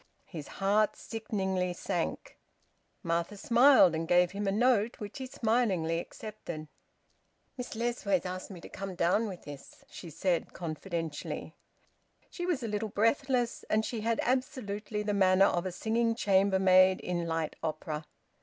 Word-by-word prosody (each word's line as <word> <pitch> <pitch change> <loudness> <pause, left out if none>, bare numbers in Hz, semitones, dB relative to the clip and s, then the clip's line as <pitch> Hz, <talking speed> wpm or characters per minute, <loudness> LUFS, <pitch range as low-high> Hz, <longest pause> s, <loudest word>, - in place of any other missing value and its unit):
His 155 -6 -8
heart 205 +2 +2
sickeningly 190 -5 -2
sank. - - -3 0.7
Martha 170 +3 -1
smiled 235 - +6
and 160 +1 -2
gave 175 +1 +4
him 200 +1 -3
a - - +2
note, 235 +1 +2
which 210 +5 -7
he 260 - -5
smilingly 215 -10 +1
accepted. 170 -6 -7 0.9
"Miss 250 -3 -6
Lessways 220 -6 0
asked 185 0 -5
me 190 -4 -9
to - - -9
come 195 -1 -6
down 180 +7 +2
with 185 -4 -8
this," 145 -1 -11
she 170 - -9
said 170 +2 -1
confidentially. 165 -2 -5 0.8
She 350 0 -4
was 320 -9 0
a - - -2
little 210 0 -2
breathless, 240 +3 +1
and 215 +1 +2
she 230 -3 -3
had 230 +1 0
absolutely 215 -5 -2
the 210 0 -1
manner 190 -1 +5
of 175 -1 +1
a - - -3
singing 230 +4 0
chambermaid 190 -2 +4
in 175 -1 -2
light 165 -1 -2
opera. 155 -1 -4
195 Hz, 145 wpm, -30 LUFS, 175-225 Hz, 0.9 s, smiled